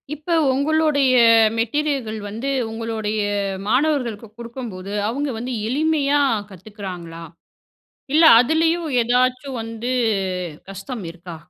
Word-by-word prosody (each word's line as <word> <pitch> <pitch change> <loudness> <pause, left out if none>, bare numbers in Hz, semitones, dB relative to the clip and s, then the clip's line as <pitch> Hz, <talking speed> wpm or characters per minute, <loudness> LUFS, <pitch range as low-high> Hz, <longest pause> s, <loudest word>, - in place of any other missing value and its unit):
இப்ப 310 +4 -4 0.2
உங்களோடைய 290 -2 +2 0.4
மெட்டீரியல்கள் 240 -1 -1
வந்து 230 +7 -4 0.2
உங்களோடைய 225 -1 -3 0.5
மாணவர்களுக்கு 250 -4 0
குடுக்கும்போது, 230 -5 -7 0.2
அவங்க 280 +5 -2
வந்து 250 +2 -4
எளிமையா 290 +1 +1 0.3
கத்துக்கிறாங்களா? 185 -4 -9 0.9
இல்ல 320 +2 +5 0.2
அதிலயும் 325 +4 +1
ஏதாச்சும் 255 +2 0
வந்து 230 +2 -5 0.8
கஷ்டம் 195 +2 -7
இருக்கா? 170 0 -10
245 Hz, 90 wpm, -21 LUFS, 215-285 Hz, 0.9 s, இல்ல